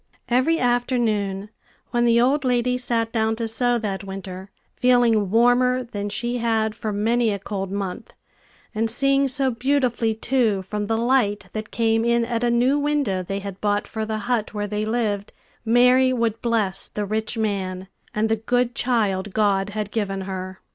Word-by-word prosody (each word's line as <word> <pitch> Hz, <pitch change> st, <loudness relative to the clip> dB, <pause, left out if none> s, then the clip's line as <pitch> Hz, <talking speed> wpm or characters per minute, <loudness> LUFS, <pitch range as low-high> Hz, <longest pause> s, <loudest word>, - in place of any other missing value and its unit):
Every 255 Hz, +7 st, +3 dB
afternoon, 230 Hz, -6 st, 0 dB, 0.4 s
when 240 Hz, 0 st, +2 dB
the 235 Hz, 0 st, +4 dB
old 270 Hz, +4 st, +2 dB
lady 250 Hz, -1 st, +1 dB
sat 230 Hz, -2 st, -1 dB
down 220 Hz, -1 st, +1 dB
to 230 Hz, 0 st, -3 dB
sew 240 Hz, +2 st, +1 dB
that 200 Hz, -4 st, -3 dB
winter, 190 Hz, 0 st, -7 dB, 0.3 s
feeling 240 Hz, -5 st, +3 dB
warmer 245 Hz, +3 st, +3 dB
than 205 Hz, -4 st, -5 dB
she 240 Hz, +3 st, -2 dB
had 220 Hz, -2 st, +1 dB
for 220 Hz, -1 st, -4 dB
many 225 Hz, +3 st, +1 dB
a 200 Hz, -, -1 dB
cold 195 Hz, -1 st, -5 dB
month, 195 Hz, -2 st, -5 dB, 0.6 s
and 225 Hz, +1 st, 0 dB
seeing 275 Hz, +3 st, +3 dB
so 265 Hz, 0 st, +1 dB
beautifully, 245 Hz, -3 st, 0 dB
too, 225 Hz, -4 st, +1 dB
from 205 Hz, +2 st, -4 dB
the 225 Hz, +1 st, 0 dB
light 235 Hz, -4 st, +1 dB
that 215 Hz, 0 st, -5 dB
came 225 Hz, -1 st, +1 dB
in 235 Hz, 0 st, +2 dB
at 230 Hz, 0 st, -2 dB
a 240 Hz, -, +2 dB
new 250 Hz, +4 st, +2 dB
window 285 Hz, -10 st, 0 dB
they 195 Hz, +2 st, -4 dB
had 195 Hz, -1 st, -8 dB
bought 205 Hz, 0 st, +1 dB
for 220 Hz, -, -4 dB
the 220 Hz, 0 st, -2 dB
hut 220 Hz, 0 st, -2 dB
where 205 Hz, 0 st, -1 dB
they 210 Hz, +1 st, -2 dB
lived, 215 Hz, -3 st, -2 dB, 0.3 s
Mary 250 Hz, +3 st, +4 dB
would 230 Hz, -3 st, -1 dB
bless 215 Hz, -5 st, 0 dB
the 210 Hz, -, -4 dB
rich 220 Hz, +3 st, -2 dB
man, 190 Hz, -4 st, -2 dB, 0.2 s
and 215 Hz, +1 st, 0 dB
the 225 Hz, 0 st, +1 dB
good 245 Hz, +2 st, 0 dB
child 205 Hz, -6 st, 0 dB
God 200 Hz, -2 st, +2 dB
had 210 Hz, 0 st, -4 dB
given 195 Hz, -3 st, -2 dB
her. 185 Hz, 0 st, -6 dB
225 Hz, 175 wpm, -23 LUFS, 205-245 Hz, 0.6 s, the